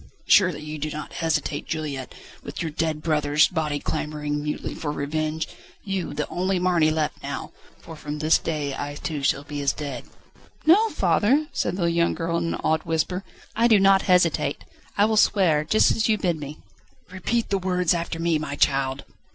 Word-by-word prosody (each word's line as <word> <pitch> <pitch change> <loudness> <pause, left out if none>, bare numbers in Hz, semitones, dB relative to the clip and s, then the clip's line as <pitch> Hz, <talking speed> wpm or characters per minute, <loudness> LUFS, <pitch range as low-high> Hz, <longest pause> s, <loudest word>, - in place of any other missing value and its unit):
"Surely 185 -6 +4
you 150 0 -6
do 155 +1 -2
not 150 0 -7
hesitate, 160 -3 -1
Juliette, 150 -5 -4 0.3
with - - -8
your 160 - -3
dead 155 0 -2
brother's 150 -1 +3
body 155 -4 -2
clamouring 150 -1 -3
mutely 150 0 -4
for 150 - -4
revenge? 155 +2 -2 0.4
You, 190 -7 -3
the 150 - -2
only 185 +1 -1
Marny 175 -3 +3
left 155 -1 -1
now! - - -5 0.3
for 165 - -9
from 150 0 -6
this 155 +2 +3
day 150 -3 -3
I 145 +1 -5
too 150 0 -4
shall 140 0 +1
be 145 -1 -5
as 140 -1 +1
dead." 140 -5 -6 0.6
"No, 410 +8 +6
father," 280 - +2
said - - -1
the 175 - 0
young 170 0 +1
girl 170 0 -1
in 170 0 -1
an - - -8
awed 160 0 +2
whisper, 165 +3 -1 0.3
"I 230 +1 +4
do 220 -4 +5
not 195 0 +5
hesitate. 170 -5 +2 0.3
I 205 - +5
will 220 0 +1
swear, 175 -8 +4
just 215 +8 +4
as 225 - +1
you 215 - +3
bid 175 -5 -1
me." 145 +1 -7 0.5
"Repeat 220 +6 -1
the 195 - +1
words 180 -2 +1
after 170 -1 -3
me, 165 -2 +1
my 150 -2 -4
child." 135 -1 +1
160 Hz, 185 wpm, -24 LUFS, 150-180 Hz, 0.6 s, No